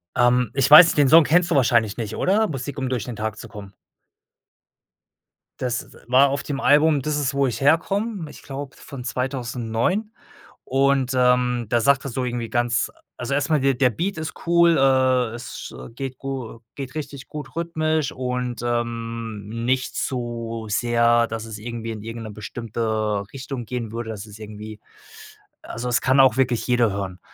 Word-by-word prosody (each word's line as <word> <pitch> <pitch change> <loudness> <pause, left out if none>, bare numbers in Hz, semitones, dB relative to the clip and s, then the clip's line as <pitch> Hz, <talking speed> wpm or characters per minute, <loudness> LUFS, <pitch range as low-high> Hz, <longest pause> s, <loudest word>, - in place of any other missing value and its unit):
Ähm, 120 -2 +3
ich 135 -1 +2
weiß 155 +4 +11
nicht, - - -1
den 145 -2 +5
Song 165 +2 +8
kennst 175 +3 +2
du - - +3
wahrscheinlich 115 -5 +3
nicht, 110 -3 -4
oder? 215 +4 +2
„Musik 140 -4 -5
um 130 -2 -2
durch 125 -4 -1
den 120 - -6
Tag 110 0 -4
zu - - -9
kommen“? 100 -2 -11 1.9
Das, 125 -1 -1
äh, - - -15
war 130 +3 +5
auf 140 +1 -2
dem 140 -2 -4
Album: 150 +1 +4
„Dis 150 +2 -1
ist 140 -1 -1
wo 140 -1 +2
ich 120 +1 -4
herkomm“, 190 +6 +1
ich - - -13
glaube 140 0 -7
von 135 -3 -9
2009 125 - -2 0.5
und, 135 -1 +2
ähm, 125 -1 +2
da 120 0 +2
sagt 140 +2 +3
er - - -3
so 130 +1 -2
irgendwie 120 -2 -3
ganz 120 -1 0 0.3
also 125 +2 -3
erst 140 +1 0
mal, 155 - +3
der 135 0 +2
der 125 0 +3
Beat 180 - -3
ist 160 - -4
cool, 170 -1 +4
äh, 130 -3 +3
es 120 0 -8
sch - - -8 0.2
geht 130 0 -6
gu 130 -4 -6 0.2
geht 135 -2 -6
richtig 140 -3 -7
gut 150 -2 -8
rhythmisch 155 -3 -1
und, 125 -2 -3
ähm, 115 -3 -3 0.2
nicht 130 +1 0
zu 115 -3 -3
sehr, 120 +1 +3
dass 110 0 -5
es 110 -2 -7
irgendwie 115 +1 -6
in 110 -2 -7
irgend 115 +1 -6
'ne 110 - -7
bestimmte 110 +2 -7 0.5
Richtung 130 -2 -6
gehen 115 -2 -4
würde, 115 0 -5
dass 105 0 -7
es 105 0 -12
irgendwie 105 0 -9 0.8
also, 120 +2 -5
es 120 - +2
kann 130 +1 +3
auch 130 -2 +6
wirklich 125 -3 +1
jeder 120 -3 +3
hören. 95 -2 -5
125 Hz, 180 wpm, -23 LUFS, 115-140 Hz, 1.9 s, weiß